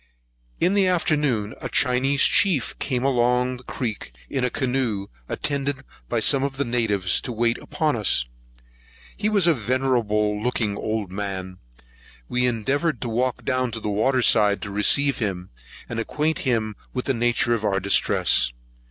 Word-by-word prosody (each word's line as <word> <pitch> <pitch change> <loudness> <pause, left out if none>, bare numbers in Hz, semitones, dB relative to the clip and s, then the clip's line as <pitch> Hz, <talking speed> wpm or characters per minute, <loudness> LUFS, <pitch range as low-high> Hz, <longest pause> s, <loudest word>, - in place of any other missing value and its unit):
In 180 - +2
the 200 -2 +3
afternoon, 145 - 0
a - - -4
Chinese 130 +3 +2
chief 175 -11 +2
came 125 -2 -1
down 125 -1 +1
the 125 - -15
creek 115 - -5 0.2
in 135 -2 -1
a 125 - +2
canoe, 125 -6 -1 0.2
attended 140 -1 -2 0.3
by 120 - 0
some 135 +5 +3
of 135 0 -2
the 140 - 0
natives, 110 -6 +1
to 125 - -5
wait 115 0 0
upon 150 -1 -1
us. 105 - +2 0.9
He 210 +1 -1
was 200 -5 +2
a 170 - +5
venerable 110 -4 0
looking 110 -3 -1
old 110 -3 -3
man; 95 -2 -5 0.7
we 125 0 +1
endeavoured 135 +5 0
to 120 - -3
walk 125 +2 -1
down 130 -2 0
to 115 - -3
the 105 - -4
water 125 +5 +1
side, 105 -3 +4
to 100 - -5
receive 140 +8 +3
him, 95 -5 -3 0.4
and 115 - -4
acquaint 150 +7 -1
him 110 -5 -1 0.2
with 125 - -2
the 135 - +1
nature 120 0 +1
of 115 -2 -2
our 100 -2 +1
distress. 95 -9 +3
125 Hz, 160 wpm, -23 LUFS, 105-135 Hz, 0.9 s, a